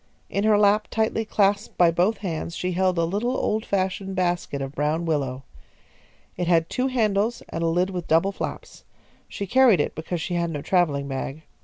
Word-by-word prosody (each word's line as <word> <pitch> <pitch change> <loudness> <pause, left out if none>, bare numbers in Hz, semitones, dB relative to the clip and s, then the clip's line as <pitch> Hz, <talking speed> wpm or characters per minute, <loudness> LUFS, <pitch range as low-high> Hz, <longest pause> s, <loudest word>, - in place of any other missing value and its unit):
In 200 +1 0
her 215 -1 +5
lap, 210 +1 +3
tightly 225 0 0
clasped 205 0 +1
by 175 -2 +5
both 185 +6 +1
hands, 165 -1 -3
she 180 - -2
held 185 0 +1
a 165 - +2
little 220 +9 -1
old 215 +1 0
fashioned 190 0 -1
basket 175 -5 -1
of 135 0 -5
brown 155 +4 -1
willow. 135 -5 -1 0.9
It 175 - -2
had 165 -2 +2
two 255 +1 0
handles 225 -2 0
and 165 - -4
a - - +2
lid 180 +3 +1
with 180 -2 -5
double 165 +5 +3
flaps. - - -7 0.4
She 200 - -5
carried 245 -3 +5
it - - 0
because 165 +2 -4
she 175 - -4
had 170 -1 0
no 150 -3 -5
travelling 150 -7 +1
bag. 135 +3 -5
180 Hz, 190 wpm, -24 LUFS, 165-205 Hz, 0.9 s, her